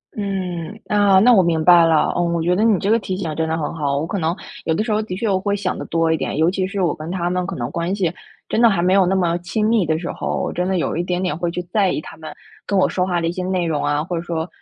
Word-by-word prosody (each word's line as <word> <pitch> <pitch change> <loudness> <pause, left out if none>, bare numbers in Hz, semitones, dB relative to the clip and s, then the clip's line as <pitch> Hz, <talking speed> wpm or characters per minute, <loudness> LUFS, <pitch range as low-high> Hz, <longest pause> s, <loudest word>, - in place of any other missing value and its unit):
嗯， 190 -1 -4
那 205 -2 +4
那 245 +2 +6
我 195 - +6
明 165 -3 +1
白 175 -2 +7
了。 160 -2 +2
嗯， 170 -1 0
我 170 - 0
觉 175 +2 +1
得 205 - +1
你 225 -3 +4
这 200 - -1
个 230 - +4
提 190 -3 -4
醒 160 -6 -4
真 160 0 -1
的 160 - 0
很 155 - -3
好， 140 -3 -1
我 150 - -1
可 200 +3 -3
能 165 +2 0 0.3
有 160 - +1
的 215 - 0
时 225 - -3
候 210 0 +1
的 215 -4 -5
确 220 +4 -2
我 190 -2 +1
会 200 +2 -1
想 195 -2 -2
得 - - -5
多 165 0 +1
一 - - 0
点。 135 - -3
尤 160 +2 +3
其 185 0 -1
是 195 0 -3
我 170 -4 +1
跟 155 +2 -8
他 175 -1 -2
们 180 0 -1
可 195 - -4
能 120 0 -3
关 170 +3 -2
系 180 -4 -1 0.3
真 230 - 0
的 235 - +7
还 195 - 0
没 185 - +3
有 195 -1 +5
那 190 - +1
么 175 -3 +1
亲 210 +5 -1
密 220 -5 +2
的 160 0 +1
时 170 - -4
候， - - -3
我 - - -3
真 180 +1 -1
的 190 -1 0
有 165 - -1
一 170 - 0
点 180 0 -2
点 180 -5 -1
会 170 +1 -2
去 180 +1 -4
在 190 +2 +1
意 - - -2
他 - - -10
们 155 -1 -9 0.4
跟 200 - 0
我 185 - +4
说 180 - -1
话 175 -2 0
的 165 - -1
一 165 - 0
些 180 +1 -4
内 185 -1 -1
容 155 -3 -1
啊， 145 +1 0
或 175 +2 -4
者 165 - -2
说， 170 -1 -3
180 Hz, 350 characters per minute, -20 LUFS, 165-195 Hz, 0.4 s, 白